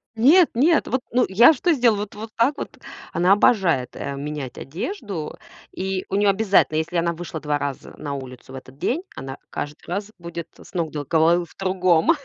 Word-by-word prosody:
Нет-нет! 300 Hz, +4 st, +4 dB
Вот 260 Hz, -, 0 dB
ну 250 Hz, +1 st, +3 dB
я 235 Hz, +10 st, +7 dB
что 340 Hz, +5 st, +1 dB
сделала, 235 Hz, -6 st, +3 dB
вот 205 Hz, -1 st, -5 dB
вот 220 Hz, +2 st, -7 dB
так 265 Hz, +6 st, +2 dB
вот. -, -, -7 dB, 0.4 s
Она 180 Hz, +2 st, +3 dB
обожает, 185 Hz, -, +3 dB
э, 140 Hz, -, -4 dB
менять 145 Hz, -2 st, -5 dB
одежду, 180 Hz, -, -5 dB, 0.3 s
и 190 Hz, 0 st, -3 dB
у -, -, -1 dB
неё 205 Hz, 0 st, +3 dB
обязательно, 195 Hz, -6 st, +3 dB
если 170 Hz, +2 st, -1 dB
она 170 Hz, 0 st, +1 dB
вышла 165 Hz, -1 st, -6 dB
2 150 Hz, -1 st, -1 dB
раза 140 Hz, -2 st, -5 dB
на 145 Hz, -2 st, -5 dB
улицу 130 Hz, -2 st, -8 dB
в 135 Hz, -, -9 dB
этот 130 Hz, 0 st, -11 dB
день, 280 Hz, -, -1 dB
она 135 Hz, +1 st, -7 dB
каждый 145 Hz, +1 st, -6 dB
раз 200 Hz, +4 st, -3 dB
будет 170 Hz, -1 st, -6 dB
с -, -, -16 dB
ног 165 Hz, -3 st, -1 dB
до 145 Hz, -2 st, -4 dB
головы 170 Hz, +3 st, +3 dB
в -, -, -21 dB
другом. 185 Hz, -, +3 dB
175 Hz, 190 wpm, -23 LUFS, 150-215 Hz, 0.4 s, я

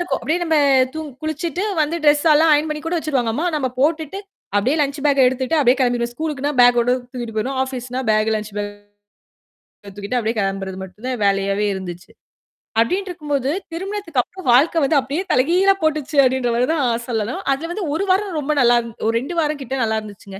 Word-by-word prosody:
இருக்கும். 350 Hz, -, -2 dB
அப்படியியே 335 Hz, +4 st, -1 dB
நம்ம 320 Hz, -2 st, +1 dB, 0.4 s
தூங் 315 Hz, -1 st, -5 dB
குளிச்சுட்டு 315 Hz, +3 st, -3 dB, 0.2 s
வந்து 315 Hz, +3 st, -1 dB
ட்ரெஸ்யெல்லாம் 300 Hz, +2 st, +5 dB
ஆயன் 300 Hz, +2 st, +1 dB
பண்ணி 300 Hz, 0 st, -3 dB
கூட 330 Hz, +2 st, -2 dB
வச்சுருவாங்க 265 Hz, -8 st, -1 dB
அம்மா, 325 Hz, +8 st, -1 dB
நம்ம 270 Hz, -4 st, 0 dB
போட்டுட்டு 315 Hz, +4 st, 0 dB, 0.4 s
அப்படியே 255 Hz, +10 st, +2 dB
லஞ்ச் 280 Hz, +1 st, -1 dB
பேக்க 275 Hz, -3 st, +4 dB
எடுத்துட்டு 260 Hz, +4 st, -1 dB
அப்படியே 260 Hz, -2 st, +4 dB
கிளம்பிடுவோம். 240 Hz, -1 st, 0 dB
ஸ்கூலுக்குனா 295 Hz, 0 st, -3 dB
பேக்கோட 245 Hz, 0 st, +5 dB, 0.2 s
தூக்கிட்டு 240 Hz, -4 st, -6 dB
போயிருவோம். 260 Hz, +5 st, -2 dB
ஆஃபீஸ்னா 255 Hz, -1 st, -5 dB
பேக் 215 Hz, +1 st, +2 dB
லஞ்ச் 215 Hz, 0 st, -6 dB
பேக். 205 Hz, 0 st, -3 dB, 1.3 s
தூக்கிட்டு 205 Hz, +5 st, -3 dB
அப்படியே 225 Hz, +1 st, -2 dB
கிளம்புறது 195 Hz, -1 st, -2 dB
மட்டும் 190 Hz, +5 st, -11 dB
தான் 250 Hz, -4 st, -3 dB
வேலையாவே 195 Hz, +1 st, +1 dB
இருந்துச்சு. 180 Hz, -2 st, -7 dB, 0.7 s
அப்டின்ட்ருக்கும்போது, 295 Hz, -2 st, -1 dB, 0.2 s
திருமணத்துக்கு 380 Hz, -5 st, -2 dB
அப்புறம் 370 Hz, 0 st, -11 dB
வாழ்க்கை 315 Hz, +6 st, +4 dB
வந்து 295 Hz, +1 st, +2 dB
அப்படியே 285 Hz, +8 st, -3 dB
தலைகீழா 355 Hz, +9 st, +4 dB
போட்டுச்சு 305 Hz, -1 st, -1 dB
அப்டின்ற 255 Hz, -1 st, +1 dB
மாரி 245 Hz, +2 st, +1 dB
தான் 295 Hz, -5 st, 0 dB, 0.2 s
சொல்லணும். 225 Hz, 0 st, -2 dB
அதுல 330 Hz, +5 st, -5 dB
வந்து 395 Hz, 0 st, -3 dB
1 390 Hz, -, -1 dB
வாரம் 385 Hz, -3 st, 0 dB
ரொம்ப 295 Hz, +1 st, -2 dB
நல்லாந் 240 Hz, -1 st, +3 dB, 0.2 s
ஒரு 225 Hz, -, +1 dB
2 345 Hz, +6 st, -6 dB
வாரம் 300 Hz, -2 st, -2 dB
கிட்ட 265 Hz, +1 st, -4 dB
நல்லா 220 Hz, -1 st, 0 dB
இருந்துச்சுங்க. 200 Hz, -2 st, -11 dB
270 Hz, 175 wpm, -20 LUFS, 235-315 Hz, 1.3 s, ட்ரெஸ்யெல்லாம்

